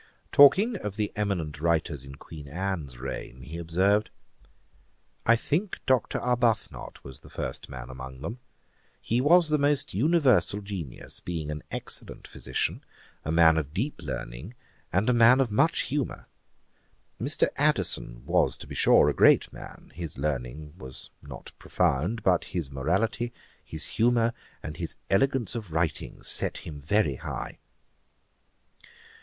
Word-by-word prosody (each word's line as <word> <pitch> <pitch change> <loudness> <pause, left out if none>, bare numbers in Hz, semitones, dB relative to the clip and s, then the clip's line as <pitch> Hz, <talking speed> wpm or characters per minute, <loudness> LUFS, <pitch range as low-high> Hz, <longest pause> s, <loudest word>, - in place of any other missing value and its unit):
Talking 195 - +6
of 105 - -5
the 105 -1 -1
eminent 85 -8 -2
writers 80 -4 0
in 70 0 -10
Queen 75 0 -11
Anne's 80 -5 -4
reign, 65 0 -6
he 80 +7 -7
observed, 95 +5 +2 1.2
'I 115 - +7
think 175 - -1
Dr. 130 -2 +2
Arbuthnot 120 -2 0 0.3
the - - -15
first - - -5
man 65 -2 -7
among 65 0 -9
them. 115 - -5 0.6
He 120 +2 0
was 165 +3 +5
the 150 -1 +2
most 145 0 +1
universal 130 - +3
genius, 95 -10 -6
being 80 -4 -4
an 75 0 -5
excellent - - -5
physician, 65 - -3 0.4
a 80 - -2
man 80 -1 +6
of 75 0 -6
deep 120 - -2
learning, 65 - -6 0.4
and 95 +5 +1
a 125 - +4
man 120 +2 +6
of 130 -5 +1
much 160 +10 +3
humour. 140 -1 -3 1.0
Mr. - - +2
Addison - - +1
was, - - +2
to - - -9
be - - -9
sure, - - +5
a - - +2
great - - +5
man; - - -11
his 85 -2 -6
learning 75 +1 -3
was 65 0 -5
not - - -10
profound; 90 - 0
but 90 -2 +3
his 85 -6 -4
morality, 95 - 0 0.3
his 80 +1 -4
humour, 115 0 +2 0.3
and 75 0 -6
his 85 -1 -4 0.2
elegance 125 +2 +2
of 110 -7 -6
writing, 80 0 -2
set - - -1
him 75 -3 -7
very 75 -3 +1
high.' - - -6
90 Hz, 140 wpm, -27 LUFS, 75-120 Hz, 1.2 s, I